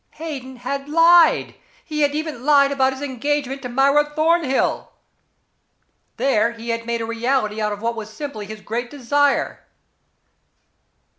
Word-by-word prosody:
Hayden 280 -5 -7
had 275 +3 -5
lied. 330 +1 +5 0.3
He 305 -2 -3
had 290 0 +2
even 305 -5 -4
lied 280 -1 +4
about 265 -1 +2
his 265 +1 -7
engagement 275 0 -2
to 250 - -6
Myra 275 +4 +3
Thornhill. 315 -3 +1 1.3
There, 235 -3 +2
he 230 0 -9
had 230 0 -3
made 235 0 -1
a - - -2
reality 230 -2 -1
out 210 0 0
of 205 +1 -6
what 235 0 -1
was 220 -1 -7
simply 220 -5 -7
his 215 0 -9
great 235 +3 -4
desire. 285 +1 0
270 Hz, 145 wpm, -21 LUFS, 235-290 Hz, 1.3 s, lied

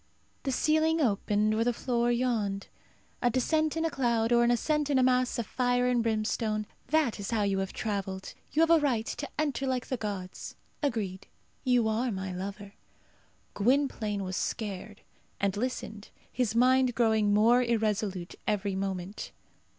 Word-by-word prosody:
The 270 - -2
ceiling 315 +4 +2
opened 210 -4 +1
or 220 +1 +2
the 245 - +2
floor 240 0 0
yawned. 225 -5 -1 0.5
A 245 - +3
descent 310 +6 +1
in 325 - 0
a 325 - 0
cloud, 235 -4 +1
or 240 0 +5
an 235 - +3
ascent 295 +5 +1
in 280 - +3
a 260 - +4
mass 255 0 +2
of 235 - -2
fire 245 +1 +1
and 250 -1 +2
brimstone, 215 -1 -1 0.2
that 305 -8 +1
is 200 - -4
how 225 -3 +1
you 195 -1 +1
have 195 -1 -2
travelled. 195 -3 -4 0.2
You 320 - +3
have 330 - +3
a 335 - +7
right 250 -7 +1
to 290 - -5
enter 285 -3 -1
like 255 -1 -1
the 255 - -1
gods. 200 -4 -5 0.3
Agreed; 215 - -2 0.4
you 250 -4 +3
are 230 +3 0
my 190 -2 -4
lover." 200 +2 -6 0.8
Gwynplaine 220 -4 +1
was 185 0 -4
scared, 205 -1 -4 0.4
and 200 0 0
listened, 220 -2 -4 0.2
his 235 -3 -1
mind 255 0 +4
growing 220 -3 +3
more 225 +4 +5
irresolute 210 -6 -1
every 205 -1 0
moment. 190 0 -4
230 Hz, 165 wpm, -29 LUFS, 205-255 Hz, 0.8 s, a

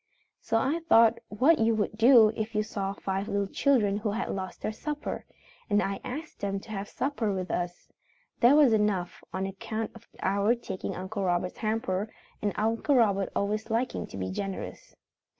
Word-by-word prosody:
So 225 - 0
I 275 +8 +1
thought 230 0 +6
what 270 +10 +4
you 225 0 +3
would 215 0 -1
do 225 -1 +7
if 220 +1 -4
you 215 - +2
saw 195 -2 -3
five 195 0 -3
little 200 -2 0
children 210 -2 +2
who 210 +1 -2
had 225 - -2
lost 190 -1 -5
their - - -1
supper, 295 +7 -5 0.4
and 205 -1 +4
I 195 -1 -1
asked 290 +6 -6
them 195 -1 -2
to 220 - -12
have 200 -1 -4
supper 260 -6 -1
with 185 -1 -3
us. 175 0 -3 0.5
There 245 +4 +6
was 290 -6 +6
enough, 205 -5 0
on 190 +1 -2
account 215 +3 -4
of 230 0 -15 0.2
our 200 +4 +2
taking 235 -5 -5
Uncle 195 +2 -4
Robert's 180 0 -1
hamper, 215 -2 -1 0.3
and 205 - 0
Uncle 225 +6 +1
Robert 200 -5 +3
always 215 +3 -1
liking 230 +3 -1
to - - -9
be 95 -1 -3
generous. 195 - -6
215 Hz, 180 wpm, -28 LUFS, 195-230 Hz, 0.5 s, do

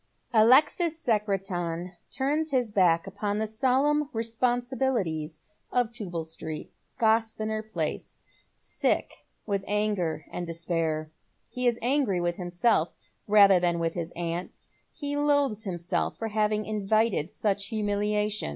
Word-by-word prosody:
Alexis 295 +9 +5
Secretan 190 - -1 0.2
turns 300 +4 0
his 250 -6 0
back 175 -5 +3
upon 205 +1 -3
the 220 - 0
solemn 270 +6 +1
responsibilities 230 - -1 0.3
of 245 -2 +1
Tubal 180 -8 -4
Street, 160 -1 -7 0.3
Grosvenor 220 -1 +1
Place, 220 0 -4 0.3
sick - - -1 0.3
with 200 -2 -1
anger 205 -7 0
and 175 -1 -4
despair. 165 -2 -2 0.4
He 250 0 -1
is 240 -1 +2
ftngry 250 -7 +2
with 175 0 -1
himself 175 0 +1 0.3
rather 200 -3 +7
than 175 -1 +1
with 165 -1 -1
his 170 -1 -4
aunt. 170 +1 -4 0.3
He 290 -2 -4
loathes 285 -7 +2
himself 175 -2 -2
for 225 - -3
having 215 0 +1
invited 215 -4 +1
such 200 0 -1
humiliation. 210 -1 -1
210 Hz, 120 wpm, -27 LUFS, 175-235 Hz, 0.4 s, rather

